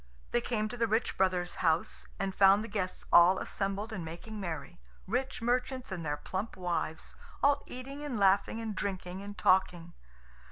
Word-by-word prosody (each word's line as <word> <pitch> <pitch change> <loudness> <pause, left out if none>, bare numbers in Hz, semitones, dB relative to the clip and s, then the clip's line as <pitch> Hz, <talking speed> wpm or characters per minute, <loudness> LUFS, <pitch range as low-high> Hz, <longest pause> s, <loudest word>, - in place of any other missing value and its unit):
They 120 - +2
came 215 -3 -1
to 245 - -7
the 230 -1 +2
rich 220 +2 0
brother's 180 -2 +1
house, 165 -1 0
and 195 -1 -1
found 195 +2 +6
the - - -5
guests 200 -4 -3
all 175 +2 +8
assembled 200 +4 -3
and 185 -5 -4
making 175 +7 -7
merry; 175 -1 -5 0.3
rich 250 +3 -2
merchants 250 0 -1
and 180 -3 -4
their 145 -1 -1
plump 190 +7 -4
wives, 175 -3 -3 0.3
all 285 0 +4
eating 275 +3 -7
and 280 -6 -3
laughing 200 +3 +3
and 220 -2 -4
drinking 185 -2 -4
and 205 0 -8
talking. 175 -2 +2
195 Hz, 170 wpm, -31 LUFS, 180-225 Hz, 0.3 s, all